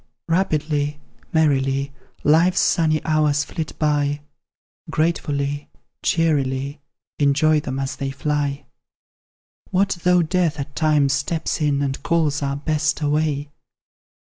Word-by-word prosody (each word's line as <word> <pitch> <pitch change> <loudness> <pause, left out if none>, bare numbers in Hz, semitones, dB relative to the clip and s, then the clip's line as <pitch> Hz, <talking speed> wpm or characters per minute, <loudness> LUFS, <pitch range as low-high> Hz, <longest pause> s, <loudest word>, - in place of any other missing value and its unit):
Rapidly, 150 -4 0 0.3
merrily, 140 -3 +1 0.3
Life's 170 +5 +4
sunny 155 -2 +2
hours 150 -2 +2
flit 160 0 -6
by, 145 -1 +1 0.7
Gratefully, 145 -3 -1 0.3
cheerily 140 -3 0 0.4
Enjoy 150 +2 +3
them 135 -2 -4
as 135 0 -3
they 135 -1 -3
fly! 145 +1 -2 1.0
What 190 -1 +1
though 180 -1 +4
Death 165 -2 0
at 140 0 -6
times 150 -3 +3
steps 155 +3 -1
in, 145 -2 +1
And 135 -1 -2
calls 155 -3 +1
our 140 -1 -1
Best 155 +2 0
away? 150 -1 0
150 Hz, 110 wpm, -22 LUFS, 140-160 Hz, 1.0 s, Life's